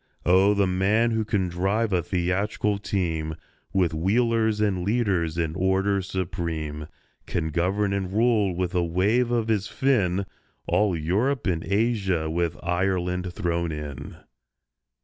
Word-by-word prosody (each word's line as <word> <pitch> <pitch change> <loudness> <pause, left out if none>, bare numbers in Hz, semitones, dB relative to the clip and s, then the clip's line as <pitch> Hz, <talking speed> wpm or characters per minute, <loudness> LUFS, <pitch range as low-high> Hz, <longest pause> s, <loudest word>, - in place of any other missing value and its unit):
Oh, 95 +4 +5
the 100 -1 +3
man 100 +6 +2
who 110 -1 0
can 100 -3 0
drive 95 +5 0
a 90 - +2
theatrical 100 +4 -1
team, 80 -6 -2 0.4
With 90 -4 +1
wheelers 110 +5 +1
and 100 -4 +1
leaders 95 -7 0
in 80 -2 -1
order 95 +2 +1
supreme, 85 -5 -4 0.4
Can 80 -2 -2
govern 95 +5 0
and 95 -2 -2
rule, 105 -3 +2
with 90 0 -2
a 90 -1 +2
wave 100 +9 +1
of 120 -2 0
his 105 -2 0
fin, 100 -9 +1 0.4
All 105 -5 +2
Europe 105 - 0
and 85 -4 0
Asia—with 90 -6 0
Ireland 90 0 -1
thrown 85 -1 -1
in! 75 -3 -7
95 Hz, 130 wpm, -25 LUFS, 85-105 Hz, 0.4 s, Oh